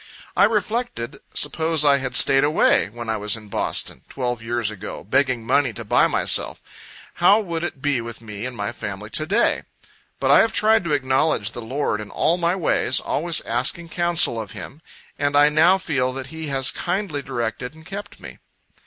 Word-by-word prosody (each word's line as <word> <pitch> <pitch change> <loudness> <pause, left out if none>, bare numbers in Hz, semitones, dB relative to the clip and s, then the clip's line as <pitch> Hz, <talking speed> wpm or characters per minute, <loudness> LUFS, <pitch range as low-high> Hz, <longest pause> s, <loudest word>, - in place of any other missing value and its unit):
I - - +6
reflected, 220 - -2 0.2
suppose 160 +1 +1
I 140 -1 +5
had 130 -1 -4
stayed 135 +1 +6
away, 150 -7 +3
when 120 +2 -8
I 110 0 -1
was 105 +1 -1
in 105 -2 -13
Boston, - - -2
twelve 120 -3 -3
years 115 -1 -2
ago, 105 0 -8
begging 125 +1 0
money 130 0 +2
to 115 0 -7
buy - - +3
myself - - +1 0.6
how 200 +5 +6
would 170 -6 -4
it 140 -6 -5
be 145 -4 +1
with 115 0 -7
me 110 0 -6
and 125 -2 -8
my 105 +2 -2
family 105 -2 -7
to 155 - -2
day? 210 +7 +2 0.6
But - - +2
I - - +7
have 225 - +3
tried 220 -1 +3
to 155 - 0
acknowledge 130 -5 +1
the 120 - -7
Lord 120 -2 -2
in 105 - -9
all 170 +2 +1
my 170 +1 +1
ways, 180 -5 +1
always 165 +2 0
asking 130 +8 -2
counsel 170 -9 +2
of 105 - -9
Him, 145 +4 -9 0.4
and 145 0 0
I 145 +1 +6
now 165 +5 +4
feel 140 -8 -1
that 135 0 -6
He 160 -1 -5
has 135 -2 +2
kindly 175 -5 -2
directed 125 0 -4
and 160 0 -15
kept 200 +3 -8
me. - - -11
135 Hz, 190 wpm, -22 LUFS, 115-165 Hz, 0.6 s, I